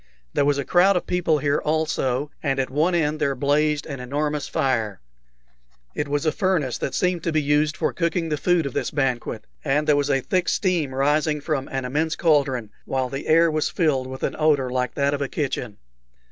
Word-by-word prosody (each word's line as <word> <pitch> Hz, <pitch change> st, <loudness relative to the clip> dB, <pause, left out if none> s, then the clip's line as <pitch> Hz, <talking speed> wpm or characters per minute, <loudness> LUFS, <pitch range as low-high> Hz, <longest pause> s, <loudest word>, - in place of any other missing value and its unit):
There 140 Hz, -, +2 dB
was 145 Hz, 0 st, +2 dB
a 140 Hz, -, -2 dB
crowd 185 Hz, +2 st, +4 dB
of -, -, -3 dB
people 175 Hz, -3 st, +1 dB
here 145 Hz, 0 st, +1 dB
also, 150 Hz, -3 st, 0 dB
and 135 Hz, -2 st, 0 dB
at 130 Hz, -1 st, -1 dB
one 160 Hz, +6 st, +2 dB
end 155 Hz, -2 st, 0 dB
there 140 Hz, -2 st, 0 dB
blazed 145 Hz, +3 st, +1 dB
an 140 Hz, -4 st, -6 dB
enormous 145 Hz, +3 st, -2 dB
fire. 120 Hz, -, -1 dB, 0.9 s
It 150 Hz, -, -2 dB
was 145 Hz, +1 st, -1 dB
a 155 Hz, -, +3 dB
furnace 180 Hz, -, 0 dB
that -, -, -3 dB
seemed 180 Hz, -2 st, +1 dB
to 165 Hz, -, -1 dB
be 155 Hz, -, +2 dB
used 150 Hz, +1 st, +1 dB
for -, -, 0 dB
cooking 170 Hz, -1 st, -1 dB
the 150 Hz, -, +1 dB
food 175 Hz, 0 st, +2 dB
of 140 Hz, -, -4 dB
this -, -, -1 dB
banquet, 135 Hz, -4 st, -2 dB, 0.2 s
and 150 Hz, +2 st, +1 dB
there 150 Hz, -, +4 dB
was 145 Hz, 0 st, 0 dB
a 135 Hz, -1 st, +2 dB
thick 180 Hz, +6 st, 0 dB
steam 170 Hz, -9 st, 0 dB
rising 150 Hz, +2 st, +1 dB
from 145 Hz, -2 st, -2 dB
an 135 Hz, -1 st, -3 dB
immense 155 Hz, +5 st, -1 dB
cauldron, 135 Hz, -, +1 dB
while 130 Hz, -1 st, -1 dB
the 135 Hz, +2 st, -5 dB
air 165 Hz, +1 st, +5 dB
was 155 Hz, 0 st, 0 dB
filled 145 Hz, -8 st, 0 dB
with 130 Hz, 0 st, -8 dB
an -, -, -1 dB
odor 145 Hz, -5 st, +2 dB
like 125 Hz, -1 st, -1 dB
that 140 Hz, 0 st, +1 dB
of 145 Hz, -, -2 dB
a 140 Hz, -, -1 dB
kitchen. 125 Hz, -7 st, -3 dB
145 Hz, 210 wpm, -23 LUFS, 135-160 Hz, 0.9 s, air